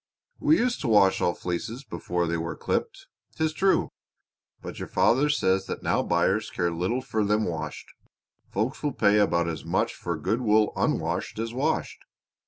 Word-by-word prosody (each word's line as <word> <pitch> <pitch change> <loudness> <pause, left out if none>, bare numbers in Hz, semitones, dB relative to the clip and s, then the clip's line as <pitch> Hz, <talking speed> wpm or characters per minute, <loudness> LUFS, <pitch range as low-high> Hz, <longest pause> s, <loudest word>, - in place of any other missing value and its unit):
We 300 +2 +4
used 245 0 0
to - - -2
wash 100 -4 +4
all 85 - +1
fleeces 110 +9 -4
before 85 -5 -2
they 85 0 -1
were 85 +1 -4
clipped, - - -3 0.3
'tis 160 -1 0
true. 190 +4 +2 0.7
But - - -8
your - - -5
father 135 +5 +3
says 95 -9 +1
that - - -5
now - - +2
buyers 110 +3 +1
care 85 -2 -1
little 90 +10 -1
for 110 -5 -1
them 105 +1 +1
washed. 80 -2 -4 0.6
Folks 110 +7 -2
will 145 -3 -1
pay 105 -1 +3
about 85 -4 +2
as 80 -2 -4
much - - 0
for 85 -2 -4
good 95 +10 -1
wool 110 -2 +3
unwashed - - -1
as 115 +1 -3
washed. 145 +6 -1
105 Hz, 175 wpm, -26 LUFS, 90-130 Hz, 0.7 s, We